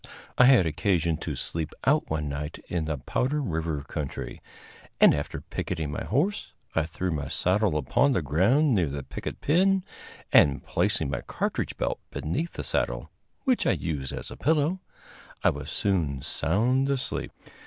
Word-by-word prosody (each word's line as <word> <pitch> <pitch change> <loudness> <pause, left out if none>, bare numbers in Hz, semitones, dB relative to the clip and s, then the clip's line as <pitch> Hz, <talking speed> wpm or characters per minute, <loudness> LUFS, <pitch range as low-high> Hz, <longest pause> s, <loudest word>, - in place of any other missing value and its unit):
I 125 - +7
had 125 -8 +7
occasion 85 0 +1
to - - -4
"sleep 80 -2 -3
out" 150 +3 +3
one 75 -1 -1
night 75 +2 -4
in 85 -3 -1
the 80 -1 -2
Powder 130 - -1
River 80 - -2
country, 75 -1 -5 0.6
and, - - +8
after 75 0 -3
picketing 80 -3 -3
my - - -4
horse, 155 - 0 0.2
I 80 -1 +1
threw 90 +3 -3
my 75 -3 -2
saddle 95 0 +2
upon 75 - +2
the 90 - 0
ground 110 - +3
near 90 -8 +2
the 70 0 -4
picket - - -6
pin, 190 +5 +3 0.5
and, 70 -1 +5
placing 70 - 0
my 65 - -2
cartridge - - -2
belt - - -1
beneath 155 - -3
the - - -5
saddle - - -1 0.3
which 255 -4 +2
I - - +4
used 70 -6 -3
as - - -6
a - - -7
pillow 160 +4 +2 0.6
I - - +5
was 70 +1 -7
soon 80 -10 0
sound 120 - +1
asleep. 135 -2 -2
85 Hz, 165 wpm, -27 LUFS, -, 0.6 s, and